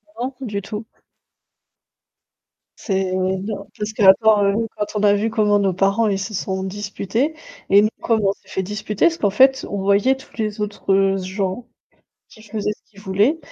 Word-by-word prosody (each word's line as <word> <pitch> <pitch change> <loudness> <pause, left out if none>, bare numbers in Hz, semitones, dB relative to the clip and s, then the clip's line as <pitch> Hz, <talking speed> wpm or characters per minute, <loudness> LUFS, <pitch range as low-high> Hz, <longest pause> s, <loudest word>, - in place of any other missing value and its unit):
Non, 255 +3 -4
du 205 -5 -3
tout 210 +3 -6 1.9
c'est 190 -3 -1
non, 190 +3 -2
parce 210 +1 -3
que 215 -1 -2
attends, 210 +2 +6
heu, 210 +3 +1
quand 210 - 0
on 210 - 0
a 205 0 +5
vu 220 +2 -1
comment 210 -2 +3
nos 195 -2 +1
parents 195 +4 +2
ils 195 -2 0
se 205 +2 -5
sont 190 0 -3
disputés 205 +7 -2 0.4
et 200 - +8
nous 215 - +2
comment 220 -4 +2
on - - +1
s'est - - -30
fait 190 - -2
disputer, 210 - -1
parce 335 0 -1
qu'en 205 -2 +1
fait, 265 +5 +4
on 200 - -4
voyait 200 +7 +3
tous 265 +2 -16
les 215 -2 -3
autres 195 -2 +1
gens 190 +4 -3 0.7
qui 215 - -16
faisaient 210 -1 -3
ce - - -15
qu'ils 200 - -16
voulaient, 205 +11 +1
205 Hz, 180 wpm, -20 LUFS, 195-220 Hz, 1.9 s, et